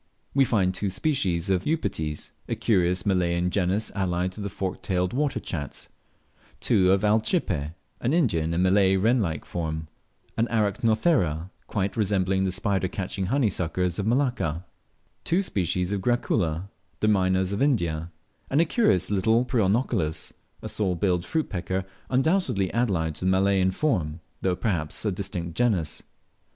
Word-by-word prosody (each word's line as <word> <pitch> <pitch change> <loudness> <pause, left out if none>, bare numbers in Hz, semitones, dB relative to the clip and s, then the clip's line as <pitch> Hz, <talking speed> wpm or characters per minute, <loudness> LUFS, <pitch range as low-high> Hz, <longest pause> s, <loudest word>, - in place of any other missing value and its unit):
We 135 -1 +4
find 95 -6 +2
two 100 +1 -2
species 95 - 0
of 90 -1 +1
Eupetes, 80 - -2 0.2
a - - 0
curious 90 -4 +1
Malayan 90 -2 +1
genus 100 +3 0
allied 90 -2 -1
to 105 - -8
the 100 - -3
forked 95 0 -4
tail 90 -1 0
water 135 +3 -1
chats; 75 -9 -5 0.7
two 95 -1 +3
of 95 +1 +2
Alcippe, 105 - +1 0.2
an 120 - 0
Indian 100 - +2
and 90 - +2
Malay 95 0 +4
wren 115 +6 +3
like 80 -6 -2
form; 80 -2 -4 0.5
an 115 +1 +2
Arachnothera, 105 - +1 0.2
quite 100 -1 -1
resembling 95 -3 +1
the 95 - 0
spider 95 -1 0
catching 95 +1 -3
honeysuckers 90 - 0
of 100 - -1
Malacca; 120 - 0 0.6
two 180 +4 +1
species 90 - -1
of 100 -2 -1
Gracula, 95 -7 0 0.3
the 105 - +1
Mynahs 95 -2 +2
of 100 - -2
India; 85 - +1 0.4
and 140 - +2
a 165 - +5
curious 105 - +2
little 110 +4 +3
black 125 - -12
Prionochilus, 105 - 0 0.3
a - - -3
saw 95 -4 -1
billed 90 -1 0
fruit 160 -1 0
pecker, 95 0 -3 0.2
undoubtedly 135 - +1
allied 95 -10 +1
to 90 - -5
the - - +3
Malayan 95 0 +3
form, 90 - -1 0.2
although 95 -1 +2
perhaps 85 -4 -2
a 105 - +2
distinct 90 -3 -3
genus. 100 -11 0
95 Hz, 150 wpm, -26 LUFS, 90-110 Hz, 0.7 s, a